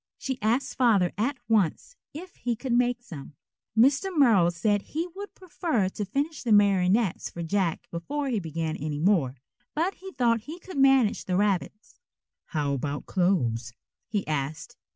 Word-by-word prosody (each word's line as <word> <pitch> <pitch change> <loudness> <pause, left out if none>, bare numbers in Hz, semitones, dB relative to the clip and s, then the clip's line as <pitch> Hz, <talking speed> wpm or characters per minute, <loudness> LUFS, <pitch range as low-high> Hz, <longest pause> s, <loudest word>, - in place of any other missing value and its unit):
She 265 -3 -4
asked 235 +5 0
Father 210 -8 +4
at 255 +7 -1
once 220 - +1 0.2
if 350 +4 -10
he 240 -1 -1
could 250 +2 -3
make 245 0 +1
some. 145 -7 -10 0.4
Mr. 275 - +4
Merrill 230 - +5
said 205 +4 +1
he 320 +9 -3
would 405 +1 -8
prefer 325 - -1
to 205 +2 -4
finish 285 - -2
the 235 - -2
marionettes 200 0 +3
for 170 - -6
Jack 185 -1 -1
before 280 - -3
he 230 -4 0
began 160 -2 -3
any 150 -1 -3
more, 155 -6 +2 0.4
but 340 +6 +1
he 385 0 -10
thought 235 -3 +2
he 310 +9 -8
could 365 -4 -7
manage 270 -5 +4
the 185 - -1
rabbits. 205 +3 -1 0.5
"How 145 -4 -1
about 140 +1 -3
clothes?" 125 - 0 0.3
he 210 -3 -2
asked. 150 0 -3
210 Hz, 160 wpm, -27 LUFS, 170-270 Hz, 0.5 s, Merrill